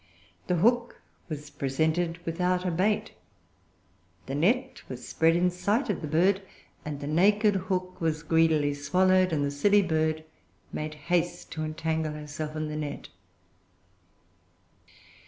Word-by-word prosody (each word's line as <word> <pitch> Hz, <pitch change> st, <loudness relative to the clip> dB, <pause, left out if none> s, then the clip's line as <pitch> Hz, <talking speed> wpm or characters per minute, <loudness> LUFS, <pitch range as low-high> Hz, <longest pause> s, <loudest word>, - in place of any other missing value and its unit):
The 180 Hz, -, +2 dB
hook 235 Hz, +7 st, +2 dB, 0.3 s
was 150 Hz, -1 st, -6 dB
presented 160 Hz, +5 st, 0 dB
without 180 Hz, +2 st, 0 dB
a 180 Hz, -, +1 dB
bait; 210 Hz, +5 st, +1 dB, 1.1 s
the 135 Hz, -, -5 dB
net 240 Hz, -, +1 dB
was 125 Hz, -1 st, -7 dB
spread 165 Hz, +1 st, +3 dB
in 180 Hz, +1 st, +2 dB
sight 205 Hz, +7 st, 0 dB
of 200 Hz, -, -4 dB
the 155 Hz, -, -4 dB
bird; 185 Hz, +6 st, +3 dB, 0.4 s
and 150 Hz, -2 st, -5 dB
the 145 Hz, -, -6 dB
naked 205 Hz, +7 st, +4 dB
hook 185 Hz, -1 st, -3 dB
was 160 Hz, -1 st, 0 dB
greedily 160 Hz, -2 st, +3 dB
swallowed; 185 Hz, +6 st, +3 dB
and 145 Hz, -3 st, +1 dB
the 140 Hz, -, -1 dB
silly 200 Hz, +8 st, +4 dB
bird 155 Hz, -2 st, 0 dB, 0.5 s
made 155 Hz, 0 st, -4 dB
haste 170 Hz, +3 st, -1 dB
to 155 Hz, -, -3 dB
entangle 160 Hz, 0 st, -2 dB
herself 150 Hz, +1 st, -6 dB
in 155 Hz, 0 st, -2 dB
the 150 Hz, -, -5 dB
net. 145 Hz, -2 st, -5 dB
165 Hz, 135 wpm, -28 LUFS, 150-185 Hz, 1.1 s, naked